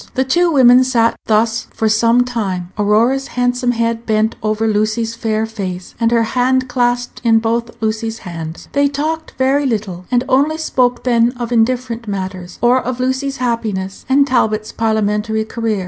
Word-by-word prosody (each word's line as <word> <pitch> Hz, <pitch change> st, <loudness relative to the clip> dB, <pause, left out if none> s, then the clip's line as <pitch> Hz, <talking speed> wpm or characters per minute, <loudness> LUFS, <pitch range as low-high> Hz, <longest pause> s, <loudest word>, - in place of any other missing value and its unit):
The 260 Hz, -, +2 dB
two 345 Hz, +6 st, +2 dB
women 255 Hz, -3 st, +6 dB
sat 235 Hz, -3 st, +2 dB
thus 225 Hz, +1 st, +1 dB
for 220 Hz, -, 0 dB
some 230 Hz, +3 st, +3 dB
time, 190 Hz, -7 st, -3 dB
Aurora's 230 Hz, +6 st, +2 dB
handsome 245 Hz, 0 st, +1 dB
head 230 Hz, 0 st, -1 dB
bent 220 Hz, 0 st, +1 dB
over 215 Hz, +1 st, 0 dB
Lucy's 215 Hz, +2 st, 0 dB
fair 220 Hz, -1 st, -1 dB
face, 190 Hz, -5 st, -6 dB
and 230 Hz, -1 st, +2 dB
her 230 Hz, -1 st, +2 dB
hand 255 Hz, +3 st, +1 dB
clasped 245 Hz, -1 st, -1 dB
in 225 Hz, -2 st, +4 dB
both 230 Hz, +1 st, -2 dB
Lucy's 220 Hz, +1 st, -2 dB
hands. 165 Hz, -2 st, -7 dB
They 285 Hz, 0 st, +2 dB
talked 310 Hz, +3 st, -3 dB
very 270 Hz, +2 st, +2 dB
little, 200 Hz, -6 st, -3 dB
and 245 Hz, 0 st, +2 dB
only 285 Hz, +4 st, +2 dB
spoke 250 Hz, -6 st, 0 dB
then 240 Hz, -1 st, +2 dB
of 245 Hz, -2 st, -5 dB
indifferent 235 Hz, 0 st, 0 dB
matters, 185 Hz, -3 st, -5 dB
or 250 Hz, +2 st, +4 dB
of 255 Hz, 0 st, -4 dB
Lucy's 260 Hz, +2 st, -1 dB
happiness 215 Hz, -6 st, -3 dB
and 275 Hz, +1 st, +4 dB
Talbot's 215 Hz, -5 st, 0 dB
parliamentary 220 Hz, 0 st, 0 dB
career. 225 Hz, -2 st, -2 dB
230 Hz, 160 wpm, -17 LUFS, 215-255 Hz, -, women